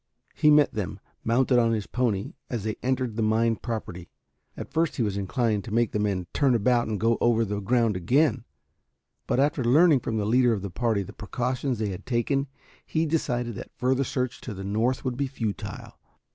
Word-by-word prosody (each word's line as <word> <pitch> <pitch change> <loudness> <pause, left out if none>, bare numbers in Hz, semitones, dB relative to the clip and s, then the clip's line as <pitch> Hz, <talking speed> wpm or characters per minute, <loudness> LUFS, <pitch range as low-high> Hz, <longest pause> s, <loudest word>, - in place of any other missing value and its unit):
He 150 - +3
met 150 -1 +5
them, 100 -6 -4 0.2
mounted 125 +2 +3
on 115 -1 +3
his 105 -3 -2
pony, 115 -6 -1 0.2
as 115 -5 -3
they 110 0 -2
entered 130 -3 -1
the - - 0
mine 110 +1 +2
property. 90 -7 -6 0.5
At - - -8
first 165 0 +1
he 120 - 0
was 100 -3 -1
inclined 105 +1 0
to 115 - -7
make 115 +1 +2
the 105 - -1
men 100 -3 -1
turn 135 -4 +3
about 120 +2 +2
and 105 -2 -2
go 115 0 +2
over 115 -1 +3
the 105 0 -3
ground 115 +1 +1
again, 125 - +2 0.8
but - - +1
after 140 -1 +2
learning 145 +4 +5
from 110 -2 -3
the 105 - 0
leader 120 +2 +4
of 100 -3 -3
the 100 - -5
party 110 -1 0
the 100 +2 -11
precautions 125 +4 -2
they 105 -1 -1
had 90 -2 -7
taken, 135 +3 0 0.4
he 160 0 -1
decided 125 -7 -1
that - - -10
further 130 +2 +1
search 125 -1 -3
to 110 - -6
the 95 - -7
north 115 +7 0
would 125 -1 -2
be 140 0 0
futile. 115 -7 -5
120 Hz, 200 wpm, -26 LUFS, 105-130 Hz, 0.8 s, met